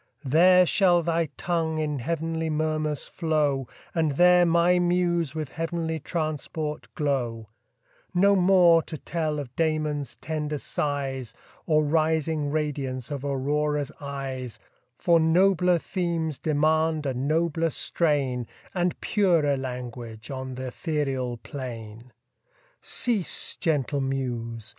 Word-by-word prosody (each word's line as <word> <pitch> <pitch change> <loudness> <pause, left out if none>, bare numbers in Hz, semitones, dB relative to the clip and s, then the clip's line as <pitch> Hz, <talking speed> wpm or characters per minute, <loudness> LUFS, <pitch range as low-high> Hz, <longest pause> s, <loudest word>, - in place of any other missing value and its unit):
There 180 +6 +6
shall 175 -2 +4
thy 165 0 +1
tongue 165 -2 -1
in 150 -2 -1
heav'nly 165 +3 -2
murmurs 155 -1 -1
flow, 150 -6 0 0.3
And 160 -3 +1
there 180 +3 +5
my 170 +2 +4
muse 175 -4 +1
with 155 -3 -3
heav'nly 165 0 -3
transport 155 -1 -3
glow: 120 -7 -1 0.6
No 200 +3 +4
more 180 -3 +5
to 155 - -7
tell 155 -1 -2
of 135 -4 -6
Damon's 155 -4 -1
tender 150 -1 -3
sighs, 135 -4 -3 0.3
Or 155 -2 +3
rising 155 -1 +1
radiance 140 -4 -2
of 140 -2 -4
Aurora's 145 +1 -1
eyes, 135 -4 -5 0.4
For 170 -1 +4
nobler 180 +2 +4
themes 165 -4 -2
demand 155 0 +1
a 135 - 0
nobler 160 +5 0
strain, 140 -8 0 0.3
And 180 -1 0
purer 170 -9 +2
language 125 -3 -6
on 130 -1 -5
th' 130 - -6
ethereal 130 -2 -2
plain. 115 -3 -8 0.7
Cease, 225 -7 0
gentle 145 -3 0
muse! 120 -4 -3
155 Hz, 115 wpm, -26 LUFS, 135-165 Hz, 0.7 s, There